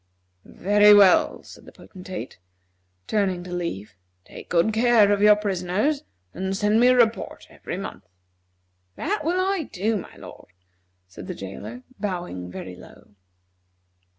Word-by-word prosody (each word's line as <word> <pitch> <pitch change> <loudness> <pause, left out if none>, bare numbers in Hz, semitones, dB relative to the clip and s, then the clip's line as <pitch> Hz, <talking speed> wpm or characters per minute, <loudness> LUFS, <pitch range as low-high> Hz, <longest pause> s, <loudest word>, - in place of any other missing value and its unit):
"Very 205 +2 +5
well," 200 -3 +4
said - - -14
the - - -13
Potentate, 185 - -9 0.7
turning 190 -4 -1
to 180 0 -8
leave; 105 - -5 0.3
"take - - -12
good 180 +5 +2
care 225 -2 +4
of 205 0 +1
your 210 0 +7
prisoners, 205 +8 -1 0.3
and 190 +2 -3
send 210 +1 +2
me 245 - +5
a 255 - +5
report 230 -3 0
every - - -7
month." - - -8 0.9
"That 395 +2 -2
will 345 +4 0
I 375 -4 -1
do, 215 +4 -1
my 190 - -9
lord," 90 - -13 0.5
said 90 - -11
the - - -5
jailer, 105 +6 -8 0.2
bowing 175 - -4
very 90 0 -8
low. 90 - -16
200 Hz, 140 wpm, -24 LUFS, 175-220 Hz, 0.9 s, your